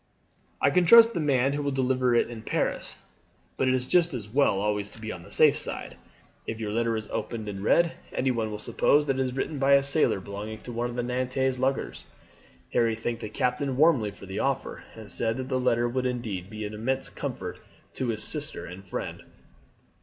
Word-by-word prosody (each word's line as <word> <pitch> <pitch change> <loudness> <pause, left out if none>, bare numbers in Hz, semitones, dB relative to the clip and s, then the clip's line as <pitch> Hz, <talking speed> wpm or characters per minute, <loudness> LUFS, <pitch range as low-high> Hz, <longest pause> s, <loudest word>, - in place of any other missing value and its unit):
"I - - +3
can 180 - +4
trust 230 +6 +8
the 175 - -1
man 140 -3 +2
who 145 - -1
will 145 - -1
deliver 130 -2 +1
it - - +3
in 120 -2 -8
Paris, - - -1 0.6
but 130 - 0
it 130 - +3
is 125 -1 -1
just 170 0 +3
as 110 -4 -5
well 115 -4 +2
always 105 0 -1
to 105 - -14
be 110 0 -5
on 90 - -7
the 85 - -14
safe - - +5
side. - - -2 0.5
If 110 - -4
your 105 -2 -3
letter 115 +1 0
is 110 -1 -5
opened 110 -2 -4
and 100 -1 -5
read, 165 +11 +3 0.2
anyone 120 -4 0
will 105 - -4
suppose 145 +7 +2
that 135 -2 0
it - - +2
is 130 -1 -1
written 145 +2 -2
by 140 +1 +4
a 140 0 +6
sailor 140 -6 +2
belonging 105 +3 -6
to 125 - -8
one 120 +1 -1
of 120 - -7
the 120 - -1
Nantes 130 +1 -1
luggers." 135 +1 -1 0.7
Harry 115 -1 +2
thanked 115 +1 -3
the 105 - -5
captain 130 +3 -1
warmly 140 -8 +4
for 100 -1 -12
the 95 +2 -5
offer, 135 -1 -2
and 110 -3 -8
said 115 0 0
that 130 0 -5
the 130 -1 +1
letter 120 -1 +2
would 130 +1 -1
indeed 110 -7 -4
be 110 0 -5
an 105 - -6
immense 130 +5 -2
comfort - - -6 0.3
to 130 - -2
his 110 -2 -2
sister 150 0 -3
and 90 +2 -9
friend. - - -5
125 Hz, 215 wpm, -27 LUFS, 110-135 Hz, 0.7 s, trust